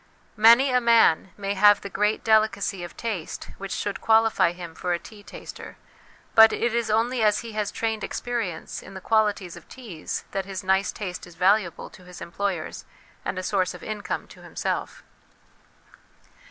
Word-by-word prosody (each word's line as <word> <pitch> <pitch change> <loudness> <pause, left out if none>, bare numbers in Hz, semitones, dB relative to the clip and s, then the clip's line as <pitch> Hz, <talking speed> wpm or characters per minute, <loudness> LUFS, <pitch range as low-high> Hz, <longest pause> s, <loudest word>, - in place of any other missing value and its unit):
Many 235 +5 +6
a 250 0 +3
man 230 -7 +4
may 200 -1 -2
have 205 +1 +5
the - - -6
great 210 +2 0
delicacy 210 -4 +2
of 175 - -9
taste 210 -9 -5
which 195 0 -6
should 205 - -3
qualify 225 -5 +4
him 175 -2 -9
for 180 +2 -2
a - - +1
tea 210 +4 -14
taster, 205 - -10 0.6
but 220 0 +8
it 235 0 -1
is 235 -2 0
only 230 +3 +1
as 210 -1 +3
he 230 0 -8
has 210 -1 -2
trained 220 -1 -2
experience 230 -9 -4
in 195 - -12
the - - -6
qualities 205 -4 0
of 170 - -14
teas 215 -12 -6
that 195 -1 -2
his 190 -1 -6
nice 190 0 +2
taste 185 -3 -6
is 175 - -15
valuable 185 0 +1
to 185 - -16
his 180 0 -11
employers, 175 -1 -4 0.4
and 185 - -3
a 185 - -3
source 185 -1 0
of - - -12
income 215 -1 -4
to - - -15
himself. - - -4
205 Hz, 175 wpm, -25 LUFS, 185-220 Hz, 0.6 s, but